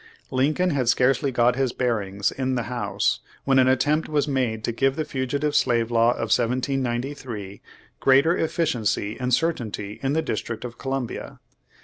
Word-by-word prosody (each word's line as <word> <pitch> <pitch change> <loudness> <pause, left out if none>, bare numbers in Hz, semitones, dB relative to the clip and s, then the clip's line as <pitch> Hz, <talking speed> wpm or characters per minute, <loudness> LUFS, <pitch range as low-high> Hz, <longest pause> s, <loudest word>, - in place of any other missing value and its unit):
Lincoln 155 +8 +1
had 130 -5 +1
scarcely 135 +2 +2
got 120 0 +3
his 130 -2 0
bearings 100 -5 -1
in 130 -1 -2
the 120 - -1
House, 120 0 -1 0.2
when 135 -1 +3
an 130 - +5
attempt 145 +5 +2
was 150 -1 +1
made 125 -6 -1
to - - -1
give 135 +3 +1
the 155 0 -2
Fugitive 140 +1 -2
Slave 120 -2 +2
Law 115 +1 +4
of - - 0
1793 125 -3 -2 0.4
greater 140 +6 +4
efficiency 120 - -1
and 125 0 -1
certainty 115 -9 -1
in 135 +1 0
the 160 +1 +1
District 115 -6 -4
of 120 -1 -8
Columbia. 135 -3 -4
130 Hz, 155 wpm, -24 LUFS, 120-140 Hz, 0.4 s, an